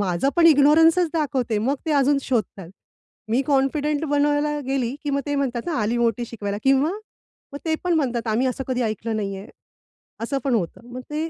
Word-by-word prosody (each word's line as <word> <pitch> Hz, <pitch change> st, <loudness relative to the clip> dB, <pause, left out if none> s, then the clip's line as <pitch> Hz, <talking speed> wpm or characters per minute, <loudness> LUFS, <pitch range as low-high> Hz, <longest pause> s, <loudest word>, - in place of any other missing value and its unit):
माझं 185 Hz, +5 st, 0 dB
पण 335 Hz, -1 st, +6 dB
इग्नोरन्सचं 325 Hz, +4 st, +5 dB
दाखवते. 265 Hz, -8 st, 0 dB
मग 255 Hz, +7 st, 0 dB
ते 315 Hz, -, +1 dB
अजून 280 Hz, 0 st, +3 dB
शोधतात. 210 Hz, -8 st, -2 dB, 0.6 s
मी 245 Hz, +4 st, +2 dB
कॉन्फिडंट 290 Hz, +2 st, +1 dB
बनवायला 290 Hz, +1 st, +1 dB
गेली, 265 Hz, -2 st, -1 dB
की 290 Hz, -, -1 dB
मग 280 Hz, 0 st, 0 dB
ते 290 Hz, -, -1 dB
म्हणतात 255 Hz, -4 st, -1 dB
ना, 335 Hz, -, -2 dB
"आली 225 Hz, +3 st, 0 dB
मोठी 235 Hz, 0 st, 0 dB
शिकवायला" 205 Hz, -3 st, -5 dB
किंवा 270 Hz, +4 st, +3 dB, 0.6 s
मग 285 Hz, -, -6 dB
ते 320 Hz, -1 st, +1 dB
पण 355 Hz, -, +1 dB
म्हणतात, 245 Hz, -7 st, -1 dB
"आम्ही 235 Hz, +4 st, +1 dB
असं 260 Hz, +1 st, -3 dB
कधी 250 Hz, -1 st, 0 dB
ऐकलं 220 Hz, 0 st, -2 dB
नाही 195 Hz, -2 st, -3 dB
आहे. 195 Hz, +2 st, -10 dB, 0.8 s
असं 275 Hz, +4 st, -2 dB
पण 265 Hz, -4 st, +1 dB
होतं. 215 Hz, +4 st, -4 dB
मग 255 Hz, -, -6 dB
ते, 310 Hz, +2 st, -3 dB
270 Hz, 190 wpm, -23 LUFS, 230-295 Hz, 0.8 s, पण